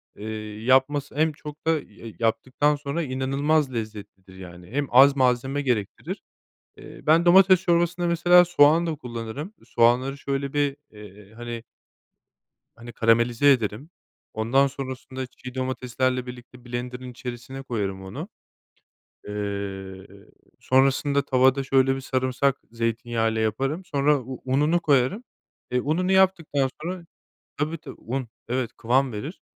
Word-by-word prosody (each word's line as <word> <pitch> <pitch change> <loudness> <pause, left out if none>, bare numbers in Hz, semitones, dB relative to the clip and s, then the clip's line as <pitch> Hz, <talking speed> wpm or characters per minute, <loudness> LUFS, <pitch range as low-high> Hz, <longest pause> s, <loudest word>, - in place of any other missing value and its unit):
eee, 110 0 -7
yapması 135 +3 +2
hem 155 +2 +2
çok 150 +1 -11
da - - +5
ya 115 -8 -5
yaptıktan 130 +6 +1
sonra 145 +3 -3
inanılmaz 135 +2 0
lezzetlidir, 105 -4 -7
yani, 90 -1 -11
hem 140 +2 -1
az 135 +3 +7
malzeme 130 +1 +1
gerektirir. 120 -8 -2 0.6
Eee, - - -12
ben 160 +3 +5
domates 185 +1 +6
çorbasında, 175 0 +1
mesela, 175 +1 +5
soğan 165 -1 +4
da 165 - -1
kullanırım. 125 - -7
Soğanları 125 +4 +2
şöyle 140 0 -3
bir, 145 -1 0
eee, 105 -1 -14
hani 120 0 -7 1.1
hani, 120 0 -11
karamelize 120 +5 +3
ederim, 120 +3 -1 0.4
ondan 120 +6 +2
sonrasında 130 -1 -6
çiğ 125 0 -11
domateslerle 130 0 -1
birlikte 125 0 -11
blenderın 125 +1 -5
içerisine 125 +2 -7
koyarım 100 -7 -3
onu. 95 - -7 1.0
Eee, 100 -2 -5 0.5
sonrasında 135 +2 +2
tavada 130 0 +3
şöyle 135 0 +3
bir 135 - -6
sarımsak 130 +1 0
zeytinyağı 115 0 -1
ile 110 - -2
yaparım 135 - -1
sonra 145 -1 +2
u 130 +1 -8
ununu 150 +6 +2
koyarım. 145 - +2 0.5
E, 125 0 +1
ununu 175 +7 0
yaptıktan 180 -8 +2
sonra 175 +1 -5 0.5
tabii, 155 +3 -2
tabii, 160 - -11
un, 130 +1 -4 0.2
evet, 125 0 -2
kıvam 130 +3 +1
verir 125 - -7
130 Hz, 130 wpm, -24 LUFS, 115-145 Hz, 1.1 s, az